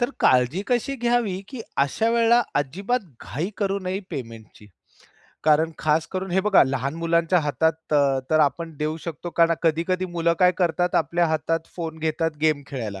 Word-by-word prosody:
तर 240 +2 +1
काळजी 130 +9 +3
कशी 250 +2 0
घ्यावी, 235 -6 0
की 260 -4 -7 0.2
अशा 140 +12 +1
वेळेला 235 +1 +4
अजिबात 195 - -1 0.2
घाई 165 +9 -3
करू 200 -1 -1
नये 185 +1 -3
पेमेंटची. 115 -4 -9 0.8
कारण 155 +1 +4
खास 155 +1 +1
करून 190 0 -3
हे 190 +2 +2
बघा 205 0 +5
लहान 135 +1 -2
मुलांच्या 170 +1 +2
हातात 160 +2 +1 0.2
तर, 140 -2 +3
तर 155 0 +4
आपण 160 +2 0
देऊ 155 +2 -2
शकतो 170 +1 -6
कारण 165 +1 +3
कधी-कधी 170 +3 +1
मुलं 170 -1 0
काय 180 -1 +5
करतात, 175 0 +1
आपल्या 170 +3 +2
हातात 160 +1 -1
फोन 160 -2 -5
घेतात 160 +1 -1
गेम 155 -2 +2
खेळायला. 110 -8 -5
165 Hz, 165 wpm, -23 LUFS, 150-185 Hz, 0.8 s, बघा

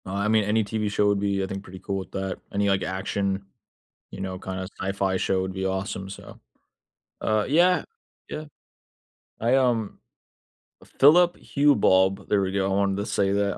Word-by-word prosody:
Uh, 95 - -6
I 100 +1 0
mean, 110 0 +3
any 110 +2 +1
TV 105 0 -2
show 105 0 +2
would 100 -1 +2
be, 100 -1 0
I - - -2
think, 95 0 -6
pretty 95 -1 -11
cool 100 0 -3
with 95 - -9
that. 95 -1 -3 0.2
Any 100 0 +1
like 95 -1 +1
action, 95 0 -2 0.7
you - - -9
know, 95 -1 -4
kinda 95 0 -5
sci-fi 95 0 0
show 95 0 0
would 95 0 -3
be 95 0 -3
awesome, 95 0 -3
so. 100 - -11 0.8
Uh, 110 -1 +1
yeah, 175 +5 +4 0.4
yeah. 155 - -5 1.0
I, 120 +3 +2
um 120 -5 +1 1.0
Philip 175 +5 +6
Hue 145 0 +5
Bulb, 95 0 +3
there 100 -1 +2
we 95 0 -2
go. 95 -1 0
I - - +1
wanted 100 -1 +1
to 100 - -2
say 100 -1 +1
that. 100 0 +1
100 Hz, 185 wpm, -25 LUFS, 95-110 Hz, 1.0 s, Philip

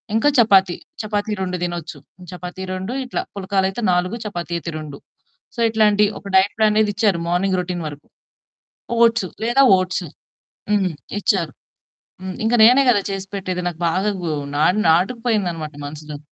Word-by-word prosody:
ఇంకా 260 +6 +4
చపాతీ. 195 -6 +5 0.3
చపాతీ 210 0 -2
2 180 -1 -2
తినొచ్చు. 175 -2 -4 0.3
చపాతీ 180 +1 -7
2 190 +6 -4
ఇట్లా, 250 - -3
పుల్కాలయితే 195 +2 -1
4, 180 +4 0
చపాతీ 175 -4 -5
అయితే 170 - -6
2. 150 -2 -8 0.6
సో, 235 - -9
ఇట్లాంటి 210 -2 +3 0.2
ఒక - - -12
డైట్ 190 +2 +4
ప్లాన్ 215 -1 +3
అనేదిచ్చారు. 210 -3 +2
మార్నింగ్ 185 +2 +1
రొటీన్ 180 -1 -3
వరకు. 145 0 -10 1.0
ఓట్స్ 230 -4 +3 0.2
లేదా 240 +4 +4 0.2
ఓట్స్ 185 0 -2 0.7
హ్మ్. 195 -4 +2 0.3
ఇచ్చారు. 170 -7 0 0.7
హ్మ్. 185 0 -5
ఇంకా 235 +2 +3
నేనే 250 +4 +7
కదా 205 - +3
చేసి 195 0 -4
పెట్టేది 185 -2 -3
నాకు 175 -1 -4
బాగా 190 +5 0
గు 170 - -2 0.3
నా 150 - +3 0.2
నాటుకుపోయిందనమాట 180 -4 0
మనసులో. 150 +1 -7
190 Hz, 145 wpm, -20 LUFS, 175-210 Hz, 1.0 s, నేనే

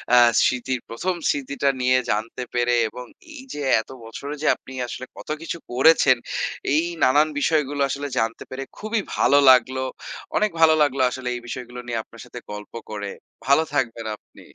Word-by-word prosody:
আ - - +7 0.3
স্মৃতির 125 0 0
১ম 175 +11 -2
স্মৃতিটা 140 0 0
নিয়ে 130 +1 +4
জানতে 115 +4 -2
পেরে 120 0 +2
এবং 125 +2 -9 0.3
এই 275 - -9
যে 150 - -5 0.2
এত - - -19
বছরে 140 +6 -7
যে - - 0
আপনি 135 - -13
আসলে 130 - -6
কত - - -11
কিছু 170 - -4
করেছেন 130 -1 +5 0.6
এই 155 +2 +3 0.2
নানান 145 +4 +5
বিষয়গুলো 145 -2 +1
আসলে 140 +1 -3
জানতে 115 0 -2
পেরে 135 +1 -5
খুবই 215 0 -1 0.2
ভালো 145 - +5
লাগলো। 130 +1 +4 0.5
অনেক 215 -1 +2
ভালো 160 -1 +7
লাগলো 140 -2 +2
আসলে 130 0 -6
এই 120 - -6
বিষয়গুলো 125 0 -7
নিয়ে 115 -2 -1
আপনার 115 -1 -15
সাথে 125 - -9
গল্প 105 +1 -8 0.2
করে। 100 -2 -5 0.4
ভালো 140 +4 +5
থাকবেন 115 -4 -1
আপনি। - - -19
130 Hz, 170 wpm, -23 LUFS, 120-145 Hz, 0.6 s, আ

